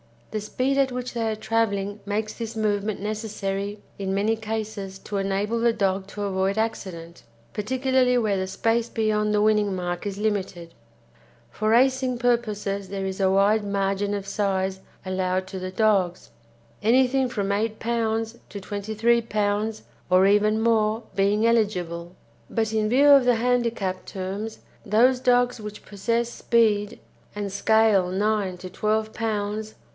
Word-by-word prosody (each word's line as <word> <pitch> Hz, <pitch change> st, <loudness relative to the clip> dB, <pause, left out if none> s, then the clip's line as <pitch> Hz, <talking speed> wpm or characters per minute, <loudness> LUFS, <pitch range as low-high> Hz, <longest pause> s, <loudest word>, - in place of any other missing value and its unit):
The 215 Hz, -, -2 dB
speed 255 Hz, +6 st, -1 dB
at 270 Hz, -2 st, +2 dB
which 250 Hz, 0 st, -4 dB
they 230 Hz, -2 st, -1 dB
are 220 Hz, -, -1 dB
travelling 210 Hz, -2 st, -1 dB
makes 215 Hz, +1 st, -2 dB
this 230 Hz, -1 st, -6 dB
movement 210 Hz, -1 st, -1 dB
necessary 205 Hz, -1 st, -3 dB, 0.2 s
in 190 Hz, -1 st, -2 dB
many 210 Hz, +3 st, +2 dB
cases 215 Hz, -3 st, -5 dB
to 205 Hz, -, -5 dB
enable 200 Hz, +4 st, -1 dB
the 235 Hz, 0 st, +3 dB
dog 195 Hz, -3 st, 0 dB
to 205 Hz, +1 st, -6 dB
avoid 195 Hz, 0 st, 0 dB
accident, 175 Hz, -6 st, -4 dB, 0.3 s
particularly 255 Hz, +3 st, +1 dB
where 215 Hz, -4 st, +1 dB
the 190 Hz, 0 st, -2 dB
space 225 Hz, +4 st, 0 dB
beyond 215 Hz, -1 st, 0 dB
the 210 Hz, -, +3 dB
winning 210 Hz, -2 st, +2 dB
mark 175 Hz, +1 st, -3 dB
is 200 Hz, -1 st, -4 dB
limited. 195 Hz, -5 st, -2 dB, 0.8 s
For 215 Hz, -, -1 dB
racing 255 Hz, +2 st, +3 dB
purposes 210 Hz, -5 st, -1 dB
there 195 Hz, 0 st, -3 dB
is 190 Hz, 0 st, -4 dB
a 190 Hz, -1 st, +3 dB
wide 205 Hz, +2 st, +3 dB
margin 200 Hz, 0 st, 0 dB
of 200 Hz, -1 st, -4 dB
size 195 Hz, -1 st, -1 dB, 0.3 s
allowed 185 Hz, 0 st, -1 dB
to 190 Hz, 0 st, -6 dB
the 185 Hz, 0 st, -4 dB
dogs, 190 Hz, -3 st, +1 dB, 0.5 s
anything 260 Hz, +3 st, +3 dB
from 200 Hz, -4 st, -2 dB
8 215 Hz, +2 st, -1 dB
lbs. 225 Hz, 0 st, -1 dB
to 200 Hz, -, -7 dB
23 220 Hz, +4 st, 0 dB
lbs., 215 Hz, 0 st, -1 dB, 0.3 s
or 185 Hz, +1 st, +5 dB
even 210 Hz, +2 st, +3 dB
more, 225 Hz, 0 st, +2 dB
being 205 Hz, +3 st, +2 dB
eligible; 180 Hz, -7 st, 0 dB, 0.3 s
but 220 Hz, -1 st, -1 dB
in 215 Hz, -1 st, +1 dB
view 275 Hz, +5 st, +5 dB
of 280 Hz, -3 st, +7 dB
the 245 Hz, -1 st, +4 dB
handicap 230 Hz, -5 st, 0 dB
terms 195 Hz, +4 st, -5 dB, 0.3 s
those 245 Hz, +5 st, +4 dB
dogs 245 Hz, -1 st, +2 dB
which 210 Hz, -1 st, -8 dB
possess 230 Hz, +4 st, -1 dB
speed, 215 Hz, -3 st, +1 dB, 0.4 s
and 205 Hz, -1 st, -3 dB
scale 215 Hz, -1 st, +3 dB
9 200 Hz, -1 st, 0 dB
to 185 Hz, 0 st, -7 dB
12 215 Hz, +3 st, -1 dB
lbs. 215 Hz, -1 st, -3 dB
210 Hz, 150 wpm, -24 LUFS, 195-225 Hz, 0.8 s, of